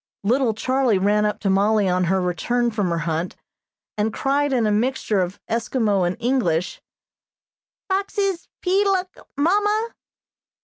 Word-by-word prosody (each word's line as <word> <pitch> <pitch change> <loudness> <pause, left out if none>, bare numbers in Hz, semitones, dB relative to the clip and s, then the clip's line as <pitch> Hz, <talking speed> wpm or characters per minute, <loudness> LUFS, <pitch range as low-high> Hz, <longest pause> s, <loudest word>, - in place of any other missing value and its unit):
Little 235 +1 +1
Charlie 255 -2 +1
ran 210 +2 +2
up 210 0 -3
to 200 - 0
Mollie 205 +1 +3
on 180 0 +1
her 190 +2 +1
return 235 +7 0
from 205 -4 -1
her 170 - -1
hunt, 165 +2 -2 0.6
and 215 +1 +1
cried 280 +3 0
in 245 -4 +2
a 210 - +2
mixture 215 -2 0
of 180 +1 -4
Eskimo 220 -5 0
and 175 - -3
English: 210 -9 0 1.1
"Foxes 390 -1 -1 0.2
peeluk, 380 0 +1 0.2
Mamma?" 415 +8 +2
225 Hz, 135 wpm, -22 LUFS, 195-280 Hz, 1.1 s, Mollie